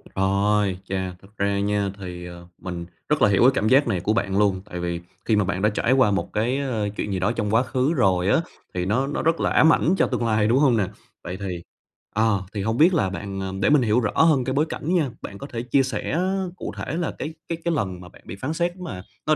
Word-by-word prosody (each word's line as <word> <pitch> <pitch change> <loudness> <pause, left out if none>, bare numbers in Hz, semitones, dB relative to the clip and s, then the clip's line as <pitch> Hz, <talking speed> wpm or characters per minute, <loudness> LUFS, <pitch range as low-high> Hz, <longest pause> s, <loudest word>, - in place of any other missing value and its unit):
Rồi, 100 0 +2
chà, 95 -1 -2
thật 95 - -16
ra 100 0 +1
nha 100 0 0
thì, 90 -2 -7
ờ, 85 0 -10
mình 85 -2 -5 0.2
rất 150 - +2
là 105 - +6
hiểu 100 - +3
cái 125 +2 +7
cảm 110 -3 0
giác 135 +3 +5
này 95 -6 0
của 105 +5 0
bạn 100 -3 0
luôn, 100 -2 +2
tại 90 -4 -7
vì 85 -1 -2 0.3
khi 110 - +3
mà 105 - +3
bạn 95 -1 -2
đã 105 - +4
trải 110 +3 0
qua 130 -6 +4
một 100 - -2
cái, 120 +5 +1
ờ, 120 -7 -1
chuyện 105 - -2
gì 95 - -1
đó 95 +4 +1
trong 105 -3 -2
quá 120 +3 +4
khứ 130 +5 0
rồi 95 - +2
á, 130 - +4 0.3
thì 90 0 -2
nó 125 +8 +1
nó 145 - -2
rất 165 +1 +1
là - - +1
ám 160 +1 +5
ảnh 180 +4 +2
cho - - +3
tương 125 -2 -1
lai, 110 -2 +2
đúng 120 +5 +3
hông 130 -6 +4
nè? 100 - +1 0.4
Vậy 90 +2 -5
thì 90 -4 -4 0.5
à, 110 - +3 0.3
thì 105 - -2
hông 110 +4 -1
biết 170 +5 +5
là 150 - +2
bạn 95 -1 -5
để - - +3
mình 150 -2 +5
hiểu 115 +1 +3
rõ 105 - 0
hơn 155 -6 +4
cái 130 +1 -2
bối 145 +3 +2
cảnh 165 +5 -3
nha, 150 -7 +2
bạn 100 - -7
có 140 - -8
thể 115 -4 -4
chia 125 +3 +2
sẻ 130 +5 -2 0.4
cụ - - -5
thể 150 - -4
là 170 -2 -1
cái 155 +3 -4
cái 165 - -3
cái 170 - +2
lần 95 - -2
mà 90 - -11
bạn - - -18
bị 90 - -7
phán 130 +10 -3
xét 175 +2 -1
mà 140 - -7 0.2
nó 155 - +4
105 Hz, 265 wpm, -24 LUFS, 95-135 Hz, 0.5 s, cái